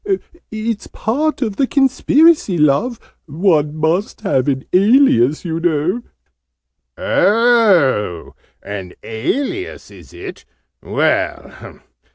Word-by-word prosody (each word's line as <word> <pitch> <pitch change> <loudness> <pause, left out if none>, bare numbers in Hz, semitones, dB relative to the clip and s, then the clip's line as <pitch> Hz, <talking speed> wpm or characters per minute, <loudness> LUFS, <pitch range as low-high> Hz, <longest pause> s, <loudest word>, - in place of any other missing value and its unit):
"It's 220 0 -4
part 285 +5 -2
of 215 -4 -4
the 270 - +1
Conspiracy, 280 - +3
Love! 160 - +1 0.3
One 155 -2 +1
must 165 +8 -1
have 150 - 0
an 135 -1 -1
alias, 185 - +3
you 165 -1 -3
know 170 +6 0 0.5
" - - -59
"Oh, 190 - +2 0.3
an 95 -3 -7
alias, 275 - -4
is - - -15
it? - - -10 0.4
Well! - - -3
190 Hz, 100 wpm, -17 LUFS, 150-240 Hz, 0.5 s, Conspiracy